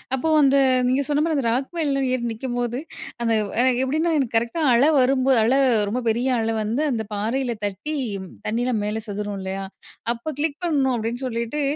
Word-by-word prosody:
அப்போ 295 +5 -2
வந்து 275 -1 +5 0.3
நீங்க 260 +2 +2
சொன்ன 295 0 +1
மாதிரி 325 -2 0
அந்த 265 - -1
ராக் 265 +3 -1
மேல 280 -4 0
ஏறி 245 -2 -1
நிற்கும்போது, 245 +1 -3 0.4
அந்த 230 -1 +2 0.3
அ - - +3 0.2
எப்படின்னா 315 +5 0
எனக்கு 245 -5 -1
கரெக்டா 235 +8 -1
அலை 270 +6 +5
வரும்போது, 260 0 +3
அலை 260 +5 +3 0.3
ரொம்ப 245 +4 -1
பெரிய 240 +4 0
அலை 225 0 0
வந்து 230 +8 -1
அந்த 225 -2 -1
பாறையில 235 +4 -1
தட்டி, 205 - -4 0.5
தண்ணீயலாம் 235 +1 0
மேலே 215 +1 -2
செதரும் 205 0 -4
இல்லையா? 190 +1 -4 0.5
அப்போ 235 +6 -6
கிளிக் 305 -1 -1
பண்ணணும். 275 -6 +1
அப்டீன்னு 235 +4 -3
சொல்லிட்டு, 235 +4 -2
250 Hz, 175 wpm, -23 LUFS, 225-275 Hz, 0.5 s, வந்து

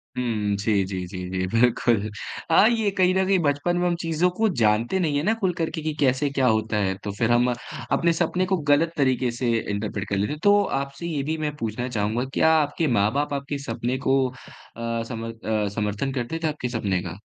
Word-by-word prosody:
हुँ। 110 -5 -1
जी, 100 -1 +1
जी, 95 -1 -4
जी, 95 0 -8
जी, 95 0 -1
बिल्कुल। 115 -1 +2 0.4
हाँ, 205 +6 +7
ये 225 -3 +1
कहीं 185 0 +4
न 190 - +2
कहीं 195 0 +3
बचपन 150 +3 +1
में 180 0 +1
हम 170 - +1
चीज़ों 165 +2 +1
को 225 - +4
जानते 110 - +2
नहीं 150 -5 +1
है 145 - 0
ना 215 +4 +3
खुल 185 -3 +1
करके 160 -1 -2
कि 155 0 -2
कैसे 135 +1 +2
क्या 135 -2 +1
होता 110 -1 +1
है, 95 0 -1
तो 100 - -3
फिर 115 -1 +1
हम 120 +1 +4 0.4
अपने 170 0 +3
सपने 175 +2 0
को 190 0 +1
गलत 165 +3 +3
तरीके 130 -3 +2
से 120 0 -1 0.2
इन्टरप्रेट 100 -1 -3
कर 100 - 0
लेते 105 +7 0
हैं। 150 - -7
तो 205 0 +5 0.2
आपसे 140 +5 -7
ये 150 -4 -2
भी 160 +2 -2
मैं 150 -1 -3
पूछना 115 +1 -3
चाहूँगा, 110 +2 -1
क्या 160 - +4
आपके 155 +1 +1
माँ-बाप 140 +9 +1
आपके 140 +1 -3
सपने 120 +3 -2
को 135 +1 +4
अ, 115 -2 -6
सम 115 -1 -6
अ, 110 -2 -2
समर्थन 105 +5 -1
करते 130 +5 -3
थे - - +2
आपके 150 -5 -3
सपने 100 -7 -1
का? 85 +1 -6
130 Hz, 215 wpm, -24 LUFS, 110-160 Hz, 0.4 s, हाँ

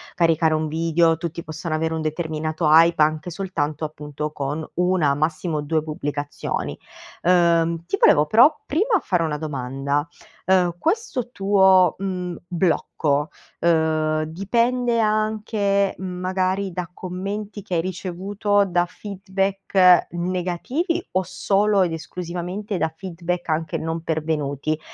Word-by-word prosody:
caricare 165 -2 +3
un 155 0 0
video, 165 +1 +2
tutti 170 +1 -5
possono 160 0 -4
avere 160 +1 -1
un 160 - -2
determinato 155 0 -2
hype, 165 +1 +6
anche 155 +3 +1
soltanto, 155 -5 -3
appunto, 150 0 -5
con 145 +2 -3
1, 180 -5 +2
massimo 155 +1 -1
2 155 +1 0
pubblicazioni. 145 -2 -4 0.5
Uhm, 170 -2 +3
ti - - -1
volevo, 150 - +5
però, 245 - +6
prima, 410 - +2
fare 180 -3 0
una 150 -2 -1
domanda: 140 0 -2 0.4
uhm, 180 -2 +3
questo 325 - -1
tuo, 190 -3 +4
mhmm, 180 -2 -3
blocco, 160 -4 0 0.3
uhm, 155 -2 +2
dipende 235 +8 0
anche, 215 -2 +1
magari, 185 +1 -1
da 175 -1 -4
commenti 200 +3 -5
che 180 - -3
hai 165 - +2
ricevuto, 190 +3 -1
da 175 -1 +1
feedback 195 -2 +2
negativi, 185 - -2
o 185 - +2
solo 195 +2 +1
ed 175 - -1
esclusivamente 180 +4 -5
da 160 - -1
feedback 175 -1 -4
anche 155 0 -1
non 165 +1 -3
pervenuti? 155 -2 -2
175 Hz, 125 wpm, -22 LUFS, 155-195 Hz, 0.5 s, hype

